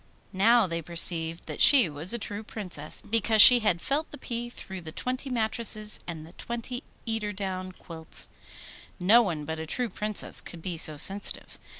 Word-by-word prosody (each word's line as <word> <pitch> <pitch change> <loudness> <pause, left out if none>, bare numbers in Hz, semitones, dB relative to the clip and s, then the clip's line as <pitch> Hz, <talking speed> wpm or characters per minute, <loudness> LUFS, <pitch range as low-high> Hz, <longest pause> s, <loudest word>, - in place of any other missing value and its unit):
Now 225 +4 +3
they 170 -2 -5
perceived 165 0 -2
that - - -7
she 265 -9 +6
was 155 +4 -2
a 235 - 0
true 205 -1 -7
Princess, 180 -9 -3
because 225 0 0
she 245 +4 +10
had 210 -6 0
felt 290 - -3
the 295 - -11
pea 240 -2 -5
through 190 -5 -10
the 160 -2 -10
twenty 255 - -5
mattresses 220 -2 +3
and 160 -3 -8
the 165 - -16
twenty 240 +4 -7 0.2
eider 225 -2 -3
down 185 -2 -6
quilts. 165 -3 -2 0.7
No 210 +7 +5
one 165 -9 -4
but 160 +1 -6
a 160 - -7
true 245 +7 -3
Princess 210 -1 -2
could 165 -2 -11
be 180 -2 -5
so 155 -2 +3
sensitive. 195 +6 +1
200 Hz, 180 wpm, -26 LUFS, 170-230 Hz, 0.7 s, she